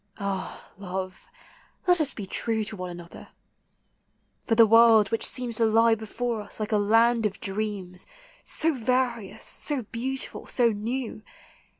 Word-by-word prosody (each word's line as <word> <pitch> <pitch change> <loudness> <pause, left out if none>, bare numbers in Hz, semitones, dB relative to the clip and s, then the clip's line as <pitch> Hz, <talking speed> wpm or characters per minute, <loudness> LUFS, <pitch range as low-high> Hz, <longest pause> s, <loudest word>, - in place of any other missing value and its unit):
Ah, 200 -2 -5
love, 185 -1 -6 0.6
let 355 -2 +5
us 285 -3 0
be 205 - -6
true 220 +3 -1
To 215 - -3
one 185 -2 -6
another! 175 -1 -10 1.2
for 225 - +2
the 230 0 +8
world, 225 -2 +6
which 225 - 0
seems 240 -3 0
To 230 - +3
lie 225 +1 +4
before 225 +1 -3
us 205 - -10
like 215 0 -3
a 215 - +3
land 225 +2 +3
of 200 - -9
dreams, 195 -3 -4 0.4
So 325 0 -1
various, 245 -4 -1
so 285 -5 -3
beautiful, 255 +5 -4
so 240 -2 +2
new. 225 +2 -4
225 Hz, 150 wpm, -26 LUFS, 205-235 Hz, 1.2 s, the